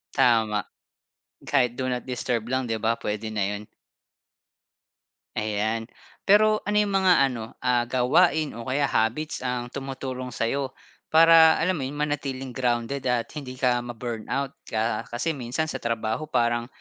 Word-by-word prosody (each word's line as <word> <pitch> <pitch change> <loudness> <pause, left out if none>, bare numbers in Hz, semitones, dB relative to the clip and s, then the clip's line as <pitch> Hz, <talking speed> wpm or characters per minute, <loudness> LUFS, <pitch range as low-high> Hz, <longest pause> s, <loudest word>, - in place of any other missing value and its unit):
Tama. 110 -4 +3 0.8
Kahit 125 -4 +1
do 130 - -2
not 125 -1 -2
disturb 120 -2 -2
lang, 130 +1 0
'di 115 -1 -2
ba, 115 +2 +1
pwede 105 +1 -3
na 105 -2 -1
'yon. 105 +1 -3 1.7
Ayan. 110 +2 -1 0.3
Pero 215 +1 +4
ano 210 0 0
'yung 205 -1 +1
mga 190 -1 +5
ano, 120 -4 -5 0.2
ah, 125 -1 +2
gawain 150 +4 +3
o 115 - -6
kaya 140 +2 +1
habits 125 +7 -1
ang 125 -1 -2
tumutulong 130 -1 -5
sa'yo 130 +4 -1 0.4
para 160 0 +7
alam 185 +3 +1
mo 135 - -2
'yun, 135 +3 -4
manatiling 140 -3 -3
grounded 125 +2 -1
at 120 -2 +1
hindi 130 -3 -7
ka 125 -2 +2
ma-burnout. 120 +3 -4
Ka 110 0 -1
kasi 145 +7 -2
minsan 130 +5 -2
sa - - -4
trabaho 115 +5 -2
parang, 120 -3 +1
125 Hz, 145 wpm, -25 LUFS, 115-140 Hz, 1.7 s, para